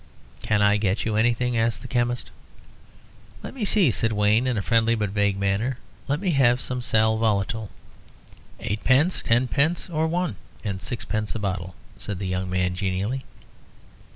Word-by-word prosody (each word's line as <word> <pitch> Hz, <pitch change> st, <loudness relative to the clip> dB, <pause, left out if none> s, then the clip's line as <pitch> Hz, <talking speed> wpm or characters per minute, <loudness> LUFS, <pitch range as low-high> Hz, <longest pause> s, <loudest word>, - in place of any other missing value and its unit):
"Can 105 Hz, -1 st, +1 dB
I 105 Hz, 0 st, +4 dB
get 100 Hz, -1 st, 0 dB
you 110 Hz, -1 st, 0 dB
anything?" 120 Hz, +2 st, +1 dB
asked 115 Hz, 0 st, 0 dB
the -, -, -7 dB
chemist. 120 Hz, 0 st, -1 dB, 1.1 s
"Let -, -, -7 dB
me 260 Hz, -5 st, -5 dB
see," 195 Hz, -, +4 dB
said 115 Hz, +1 st, +1 dB
Wayne, 105 Hz, +4 st, +3 dB
in 125 Hz, -3 st, 0 dB
a 100 Hz, -, -1 dB
friendly 115 Hz, +1 st, +3 dB
but 105 Hz, -3 st, -2 dB
vague 100 Hz, -1 st, +1 dB
manner. 100 Hz, +6 st, 0 dB, 0.3 s
"Let 145 Hz, +2 st, 0 dB
me 190 Hz, -1 st, 0 dB
have 125 Hz, -4 st, +4 dB
some 125 Hz, 0 st, -3 dB
sal 110 Hz, -2 st, +2 dB
volatile." 110 Hz, 0 st, 0 dB, 0.9 s
"Eightpence, 130 Hz, -, +1 dB
tenpence, 140 Hz, +9 st, +1 dB
or 160 Hz, 0 st, +1 dB
one 175 Hz, +1 st, -1 dB, 0.3 s
and 95 Hz, -3 st, -3 dB
sixpence 110 Hz, -3 st, -3 dB
a -, -, -2 dB
bottle?" 95 Hz, -3 st, -3 dB, 0.2 s
said 100 Hz, -, -5 dB
the 95 Hz, -, -4 dB
young 95 Hz, 0 st, -2 dB
man, 90 Hz, 0 st, 0 dB
genially. 100 Hz, +7 st, -2 dB
110 Hz, 160 wpm, -24 LUFS, 100-125 Hz, 1.1 s, I